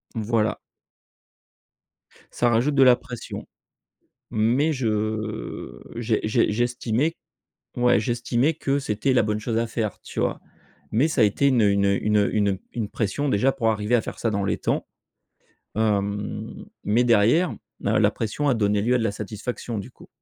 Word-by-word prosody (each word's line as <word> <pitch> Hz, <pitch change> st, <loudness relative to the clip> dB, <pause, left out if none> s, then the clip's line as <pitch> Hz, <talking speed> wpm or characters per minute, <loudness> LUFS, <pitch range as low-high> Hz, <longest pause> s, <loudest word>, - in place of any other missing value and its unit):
Voilà. 110 Hz, 0 st, 0 dB, 1.7 s
Ça 120 Hz, -, +1 dB
rajoute 120 Hz, +6 st, +2 dB
de 135 Hz, -, +6 dB
la 125 Hz, -2 st, +7 dB
pression. 120 Hz, -2 st, -8 dB, 0.8 s
Mais 125 Hz, +9 st, +2 dB
je, 130 Hz, -4 st, -1 dB
heu, 110 Hz, 0 st, -3 dB
j'es 115 Hz, -2 st, 0 dB
j'es 110 Hz, 0 st, +2 dB
j'estimais, 120 Hz, +6 st, 0 dB, 0.6 s
ouais, 120 Hz, -3 st, +4 dB
j'estimais 120 Hz, +6 st, 0 dB
que 140 Hz, -2 st, 0 dB
c'était 130 Hz, +1 st, 0 dB
la 125 Hz, -, +5 dB
bonne 105 Hz, 0 st, -1 dB
chose 115 Hz, +1 st, -2 dB
à 115 Hz, 0 st, 0 dB
faire, 110 Hz, -3 st, -3 dB
tu -, -, -7 dB
vois? -, -, 0 dB, 0.5 s
Mais 130 Hz, +9 st, +3 dB
ça 145 Hz, -6 st, 0 dB
a -, -, +7 dB
été 105 Hz, +7 st, +3 dB
une, 130 Hz, -4 st, +3 dB
heu, 105 Hz, -, +5 dB
une, 100 Hz, 0 st, +2 dB
heu, 100 Hz, -, +2 dB
une, 105 Hz, 0 st, +2 dB
heu, 100 Hz, +1 st, +1 dB
une 100 Hz, -2 st, +1 dB
une 110 Hz, -4 st, -3 dB
pression, 135 Hz, +8 st, -1 dB
déjà, 130 Hz, +6 st, +3 dB
pour 115 Hz, -5 st, 0 dB
arriver 105 Hz, +3 st, +1 dB
à 115 Hz, -, +3 dB
faire -, -, -7 dB
ça 115 Hz, -, 0 dB
dans 100 Hz, -1 st, -1 dB
les -, -, 0 dB
temps. -, -, -1 dB, 0.9 s
Hem, 105 Hz, -, -2 dB, 0.2 s
mais 115 Hz, +4 st, +3 dB
derrière, 120 Hz, -, +3 dB, 0.3 s
la 105 Hz, +2 st, +1 dB
la 105 Hz, -1 st, +4 dB
pression 120 Hz, +8 st, -2 dB
a 130 Hz, -, +4 dB
donné 105 Hz, -2 st, +1 dB
lieu 125 Hz, +3 st, +2 dB
à 125 Hz, -, +3 dB
de 115 Hz, -, -1 dB
la 100 Hz, -, 0 dB
satisfaction, 110 Hz, +2 st, -5 dB
du 100 Hz, -, -7 dB
coup. -, -, -17 dB
115 Hz, 180 wpm, -24 LUFS, 105-125 Hz, 1.7 s, la